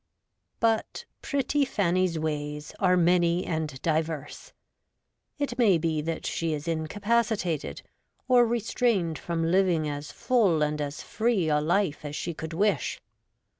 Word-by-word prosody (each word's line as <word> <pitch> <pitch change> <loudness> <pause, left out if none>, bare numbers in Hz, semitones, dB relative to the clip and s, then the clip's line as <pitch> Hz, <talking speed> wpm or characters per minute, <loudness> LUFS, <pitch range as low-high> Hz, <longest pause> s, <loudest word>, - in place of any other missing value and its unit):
But 225 -1 0 0.2
'pretty 280 +1 0
Fanny's 185 -8 +1
ways' 150 -1 -3
are 180 -2 +4
many 175 0 +3
and 155 -5 -3
diverse. 160 -2 -2 0.9
It 280 -4 -3
may 205 -7 +5
be 160 -1 -1
that 165 +1 -4
she 165 -1 -1
is 150 +2 -5
incapacitated 195 - -1 0.4
or 250 -1 +6
restrained 225 - 0
from 165 -1 -1
living 180 -4 +2
as 145 0 -5
full 200 -11 +2
and 150 0 -1
as 145 +1 -4
free 220 -7 0
a 150 0 +2
life 170 -1 0
as 145 0 -5
she 170 - -3
could 160 +1 -6
wish. 205 +5 0
170 Hz, 130 wpm, -27 LUFS, 155-205 Hz, 0.9 s, or